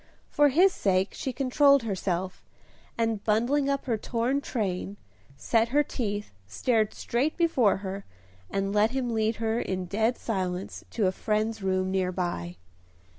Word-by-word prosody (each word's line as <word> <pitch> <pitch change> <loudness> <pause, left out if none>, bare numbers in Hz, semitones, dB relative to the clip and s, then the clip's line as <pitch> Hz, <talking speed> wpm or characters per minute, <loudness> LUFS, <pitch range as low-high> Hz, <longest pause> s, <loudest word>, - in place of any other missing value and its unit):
For 290 0 +4
his 360 +7 +5
sake 190 0 +1
she 265 - -3
controlled 275 +1 +4
herself, 190 -3 -3 0.5
and, 225 -3 0
bundling 245 +7 +2
up 275 -1 -1
her 230 -4 -1
torn 245 +5 -1
train, 200 -5 -3 0.4
set 230 0 +2
her 290 +4 +3
teeth, 210 - -4
stared 215 - 0
straight 270 +7 -1
before 275 - +3
her, 195 +1 -4 0.5
and 195 0 -1
let 210 +1 +4
him 250 -2 -2
lead 220 0 +1
her 225 +1 -1
in 185 -4 -2
dead 220 +6 0
silence 185 -3 -3
to 220 - 0
a 185 - +3
friend's 215 +2 -1
room 185 -1 0
near 185 -1 0
by. 90 - -3
220 Hz, 150 wpm, -27 LUFS, 190-250 Hz, 0.5 s, his